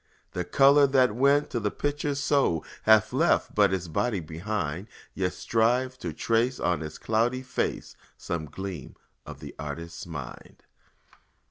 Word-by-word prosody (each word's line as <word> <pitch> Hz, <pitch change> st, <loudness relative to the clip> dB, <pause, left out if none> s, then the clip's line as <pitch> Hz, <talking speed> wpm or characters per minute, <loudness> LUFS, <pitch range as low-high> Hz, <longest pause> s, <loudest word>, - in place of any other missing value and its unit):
The 90 Hz, -, -2 dB
color 140 Hz, +9 st, +5 dB
that 130 Hz, -4 st, +3 dB
went 140 Hz, +3 st, +3 dB
to 120 Hz, -, -1 dB
the 105 Hz, -2 st, 0 dB
picture's 145 Hz, +3 st, -2 dB
soul 135 Hz, -, +1 dB, 0.2 s
Has 110 Hz, -2 st, +5 dB
left -, -, +2 dB
but 100 Hz, -2 st, +4 dB
its 95 Hz, -2 st, -2 dB
body 100 Hz, +5 st, -1 dB
behind; 85 Hz, +2 st, -4 dB, 0.3 s
Yet 90 Hz, -1 st, -1 dB
strive 125 Hz, +3 st, +1 dB
to -, -, -4 dB
trace 120 Hz, +3 st, 0 dB
on 90 Hz, -2 st, 0 dB
its 80 Hz, -1 st, -6 dB
cloudy 120 Hz, +4 st, 0 dB
face 125 Hz, -, -3 dB, 0.2 s
Some 85 Hz, -2 st, -4 dB
gleam 90 Hz, -1 st, -7 dB, 0.3 s
of -, -, -9 dB
the -, -, -8 dB
artist's 85 Hz, +4 st, -6 dB
mind. 70 Hz, -7 st, -9 dB
105 Hz, 145 wpm, -27 LUFS, 85-130 Hz, 0.3 s, color